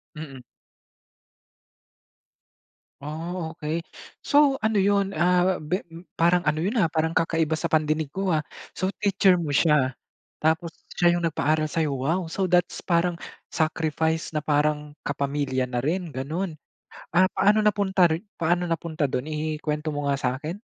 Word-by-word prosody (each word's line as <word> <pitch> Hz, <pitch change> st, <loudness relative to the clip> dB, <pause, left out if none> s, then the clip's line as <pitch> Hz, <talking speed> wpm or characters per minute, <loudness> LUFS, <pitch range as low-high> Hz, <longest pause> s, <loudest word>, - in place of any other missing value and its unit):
Mm. 145 Hz, -4 st, -8 dB, 2.6 s
Oh, 160 Hz, +3 st, -5 dB
okey. 155 Hz, +2 st, -2 dB, 0.4 s
So, 285 Hz, -2 st, +3 dB
ano 220 Hz, 0 st, +1 dB
'yon, 200 Hz, -1 st, +2 dB
ah, 180 Hz, +2 st, +3 dB
be 155 Hz, +6 st, -2 dB, 0.3 s
parang 175 Hz, +1 st, +2 dB
ano 155 Hz, 0 st, +1 dB
'yon, 205 Hz, +8 st, -1 dB
ah, 200 Hz, -, +4 dB
parang 160 Hz, 0 st, 0 dB
kakaiba 160 Hz, -1 st, +1 dB
sa -, -, -4 dB
pandinig 155 Hz, -2 st, 0 dB
ko, 195 Hz, 0 st, -1 dB
ah. 155 Hz, -3 st, +1 dB, 0.3 s
So, 190 Hz, +2 st, -1 dB
teacher 195 Hz, -3 st, +3 dB
mo 160 Hz, -, -3 dB
siya. 140 Hz, -3 st, +2 dB, 0.4 s
Tapos 160 Hz, +2 st, +1 dB, 0.2 s
siya 175 Hz, -, +3 dB
'yong 170 Hz, -, -1 dB
nagpaaral 155 Hz, -1 st, +1 dB
sa'yo. 155 Hz, 0 st, -1 dB
Wow! 165 Hz, +6 st, -1 dB
So, 190 Hz, +3 st, -1 dB
that's 180 Hz, -1 st, +2 dB
parang 170 Hz, 0 st, +1 dB, 0.3 s
sacrifice 160 Hz, 0 st, 0 dB
na 150 Hz, -, -3 dB
parang 150 Hz, 0 st, +1 dB
kapamilya 140 Hz, -2 st, -1 dB
na 125 Hz, -1 st, -2 dB
rin, 165 Hz, +3 st, -2 dB
gano'n. 160 Hz, +7 st, -3 dB, 0.6 s
Ah, 185 Hz, +2 st, +5 dB
paano 205 Hz, +3 st, +3 dB
napunta 200 Hz, -3 st, +3 dB
ri 160 Hz, +3 st, -2 dB, 0.2 s
paano 175 Hz, +2 st, +1 dB
napunta 165 Hz, -1 st, -2 dB
do'n? 135 Hz, 0 st, -1 dB
I 155 Hz, 0 st, -3 dB
i-kwento 150 Hz, 0 st, -2 dB
mo 145 Hz, -1 st, -3 dB
nga 140 Hz, -, +2 dB
sa'kin. 135 Hz, +5 st, -3 dB
160 Hz, 145 wpm, -25 LUFS, 150-180 Hz, 2.6 s, Ah